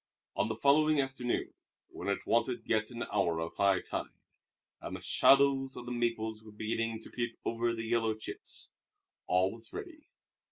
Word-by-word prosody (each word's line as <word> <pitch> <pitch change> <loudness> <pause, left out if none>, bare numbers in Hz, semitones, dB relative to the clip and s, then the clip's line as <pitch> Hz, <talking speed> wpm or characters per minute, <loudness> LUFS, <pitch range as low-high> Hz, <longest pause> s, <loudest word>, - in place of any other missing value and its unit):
On - - +1
the 110 - -2
following 150 +5 +4
afternoon, 135 -3 -1 0.4
when - - -7
it 100 - -1
wanted 120 +1 +1
yet 110 -1 +1
an 120 -1 -4
hour 85 -5 +2
of 80 0 -3
high 100 -1 +4
tide, - - -5 0.6
and - - -5
the - - -6
shadows 135 -1 +4
of 120 - -7
the 125 - -5
maples 115 -2 -1
were 110 -1 -13
beginning 110 +1 -2
to - - -12
creep 120 -1 -3
over 115 +1 +1
the 115 -1 -3
yellow 115 -1 +1
chips, 110 - -7 0.6
all 90 +1 +3
was 115 -1 -10
ready. 320 -4 -8
115 Hz, 170 wpm, -32 LUFS, 110-125 Hz, 0.6 s, following